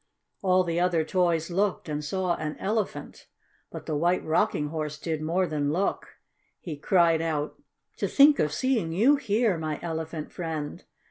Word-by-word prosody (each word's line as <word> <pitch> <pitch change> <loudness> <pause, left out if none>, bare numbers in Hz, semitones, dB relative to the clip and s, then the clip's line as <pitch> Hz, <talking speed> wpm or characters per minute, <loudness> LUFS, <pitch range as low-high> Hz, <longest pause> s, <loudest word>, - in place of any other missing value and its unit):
All 185 -1 +3
the 170 -1 -1
other 175 -2 +2
toys 170 -2 +1
looked, 195 +1 0
and 150 -1 -3
saw 185 +3 -1
an 155 -1 -5
Elephant. 210 0 -3 0.4
But - - -8
the 155 - -2
White 175 +4 +1
Rocking 150 -1 +1
Horse 155 -1 -4
did 160 -1 -3
more 170 +4 +1
than 145 -3 -1
look. 190 +5 -2 0.4
He 165 -4 -6
cried 165 +1 +3
out: 155 -2 -3 0.4
"To - - -1
think 285 +1 +6
of 150 - +1
seeing 235 - 0
you 235 - +4
here, 215 -7 +1
my 155 -2 -3
Elephant 160 -2 -4
friend! 160 -4 -5
165 Hz, 160 wpm, -27 LUFS, 155-190 Hz, 0.4 s, think